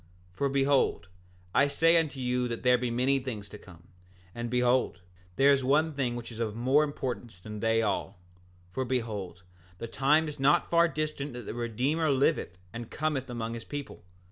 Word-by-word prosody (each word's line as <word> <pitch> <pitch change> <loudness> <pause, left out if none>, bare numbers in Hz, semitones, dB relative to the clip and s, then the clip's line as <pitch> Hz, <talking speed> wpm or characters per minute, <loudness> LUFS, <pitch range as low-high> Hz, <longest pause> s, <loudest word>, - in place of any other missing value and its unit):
7:7 - - -29
For 140 - +1
behold, 135 -7 +1 0.4
I 140 - +4
say 165 +4 +4
unto 145 -4 -2
you 125 0 0
there 125 +1 +2
be 125 0 -1
many 130 +3 +2
things 115 -6 -6
to 105 - -10
come; 85 -1 -16 0.4
and 120 0 -4
behold, 125 -5 +1 0.3
there 140 +2 +6
is 135 -1 +1
one 150 +4 +2
thing 130 -4 -1
which 120 0 -7
is 115 - -9
of 110 -2 -2
more 130 +6 +3
importance 125 -8 -4
than 105 +3 -8
they 115 +1 +2
all—for 90 +1 -5
behold, 110 -8 -3 0.3
the 115 - -5
time 150 +6 +2
is 150 -1 -7
not 140 +2 +3
far 170 0 +5
distant 155 -3 -3
that 120 0 -7
the - - -5
Redeemer 125 +7 0
liveth 135 - +1 0.2
and 115 0 -7
cometh 150 -3 -2
among 115 -1 -4
his 115 -1 -6
people. 145 -1 -7
125 Hz, 180 wpm, -29 LUFS, 115-140 Hz, 0.4 s, there